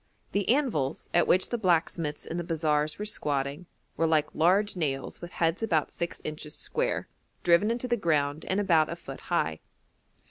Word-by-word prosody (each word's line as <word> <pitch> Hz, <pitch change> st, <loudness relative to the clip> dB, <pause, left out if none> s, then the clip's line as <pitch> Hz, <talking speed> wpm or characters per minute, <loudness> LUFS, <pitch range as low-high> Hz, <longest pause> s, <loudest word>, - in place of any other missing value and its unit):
The 200 Hz, -1 st, 0 dB
anvils, 230 Hz, -, 0 dB
at 175 Hz, -, +4 dB
which 185 Hz, +1 st, +3 dB
the 240 Hz, -, -2 dB
blacksmiths 165 Hz, -5 st, 0 dB
in 165 Hz, -, -4 dB
the 175 Hz, -, -2 dB
bazaars 155 Hz, -2 st, 0 dB
were 210 Hz, -, -4 dB
squatting, 145 Hz, -3 st, -1 dB, 0.3 s
were 165 Hz, -, +2 dB
like 155 Hz, -2 st, +2 dB
large 195 Hz, +6 st, +3 dB
nails 140 Hz, -6 st, -3 dB
with 175 Hz, 0 st, -8 dB
heads 165 Hz, +3 st, 0 dB
about 165 Hz, -9 st, +1 dB
six 170 Hz, 0 st, -4 dB
inches 155 Hz, 0 st, -5 dB
square, -, -, -1 dB, 0.4 s
driven 175 Hz, +5 st, +4 dB
into 240 Hz, +2 st, -1 dB
the 240 Hz, -, +2 dB
ground 150 Hz, -5 st, +1 dB
and 190 Hz, -, 0 dB
about 165 Hz, -6 st, +3 dB
a 170 Hz, -, -3 dB
foot 135 Hz, -5 st, -9 dB
high. 80 Hz, -, 0 dB
165 Hz, 175 wpm, -28 LUFS, 150-185 Hz, 0.4 s, at